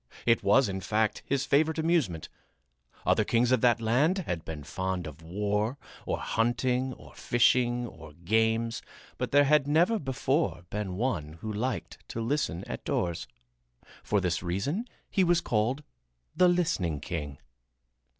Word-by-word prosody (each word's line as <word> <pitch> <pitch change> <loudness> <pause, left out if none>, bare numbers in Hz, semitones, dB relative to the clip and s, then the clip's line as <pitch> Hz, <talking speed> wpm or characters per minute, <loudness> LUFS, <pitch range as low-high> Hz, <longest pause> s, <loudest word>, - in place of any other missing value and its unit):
It 115 -1 +4
was, 105 +7 +4
in 95 -1 -3
fact, 110 +3 0
his 140 -1 0
favorite 155 +3 +2
amusement. 160 - +1 0.8
Other - - +3
kings 120 +1 +2
of 130 - +3
that 120 -2 +4
land 130 - +2
had 85 - -3
been 80 -2 -7
fond 95 +2 -3
of 75 0 -9
war 105 +8 -1 0.3
or - - 0
hunting 125 +3 0
or - - -14
fishing 120 0 +2
or 80 -8 -11
games, 110 +6 +1 0.4
but - - -1
there 145 0 +6
had 145 0 +3
never 175 +9 +3
before 135 - -1
been 100 -3 -3
one 95 - -2
who 105 +7 -6
liked 120 +4 -3
to - - -4
listen 130 - -1
at - - -6
doors. 85 -2 -1 0.7
For 105 - +1
this 90 -2 -1
reason 100 - -2 0.2
he 195 - +2
was 175 -1 +4
called 120 +5 0 0.5
"the 180 - +5
listening 105 - +1
king." 75 -2 -5
115 Hz, 150 wpm, -29 LUFS, 95-140 Hz, 0.8 s, there